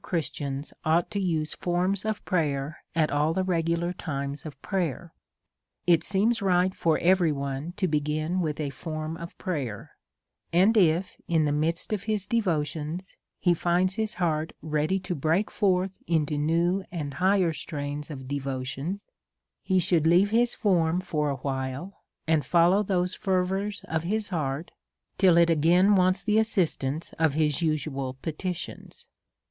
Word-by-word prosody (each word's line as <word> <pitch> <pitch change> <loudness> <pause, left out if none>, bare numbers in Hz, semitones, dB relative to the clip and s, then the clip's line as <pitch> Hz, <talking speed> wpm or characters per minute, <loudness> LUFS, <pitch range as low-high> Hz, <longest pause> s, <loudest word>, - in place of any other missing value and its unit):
Christians 145 -4 -3
ought 165 +4 +2
to 205 - -1
use 160 -5 0
forms 185 +3 -1
of 215 -1 -2
prayer 150 -3 -1 0.2
at 155 -2 +2
all 150 +2 +2
the 190 - 0
regular 170 -1 0
times 140 -3 -4
of 140 -3 -10
prayer. 170 - -2 0.7
It 170 -2 +4
seems 210 +5 +1
right 185 -1 +2
for 165 -3 +1
every 180 -2 +3
one 140 +3 -4
| - - -38
to 185 - +1
begin 155 +3 0
with 155 -3 -2
a 145 -2 -2
form 155 +3 -5
of 170 +1 -9
prayer; 140 - -4 0.6
and 190 +7 +4
if, 180 -2 +2
in 160 -2 +2
the 145 - +1
midst 160 +7 0
of 200 -2 -2 0.2
devotions, 170 -4 -2 0.2
he 175 - +3
finds 175 +2 +1
his 220 +1 -2
heart 160 -3 -1
ready 155 +4 0
to 180 -1 -3
break 165 +6 0
forth 190 -1 +1
into 155 -3 +1
new 170 +6 +1
and 150 -5 -4
higher 185 -1 +2
strains 145 -1 -5
of 135 -4 -7
devotion, 140 +6 -3 0.6
he 190 - +1
should 170 -3 +2
leave 180 +5 +4
his 235 +2 +2
form 175 -5 +2
for 150 -5 -1
a 140 - -1
while, 135 +6 -4 0.3
and 160 -2 +2
follow 175 +7 +4
those 180 -3 0
fervours 190 +1 -1
of 160 0 -1
his 210 +4 -1
heart, 155 -3 -2 0.5
till 185 -4 +6
it 170 0 +5
again 175 +6 +4
wants 185 0 +3
the 215 0 +3
assistance 165 -8 -1
of 160 -3 +2
his 155 0 +1
useful 140 -4 -1
petitions. 175 +2 -5
170 Hz, 155 wpm, -27 LUFS, 150-185 Hz, 0.7 s, till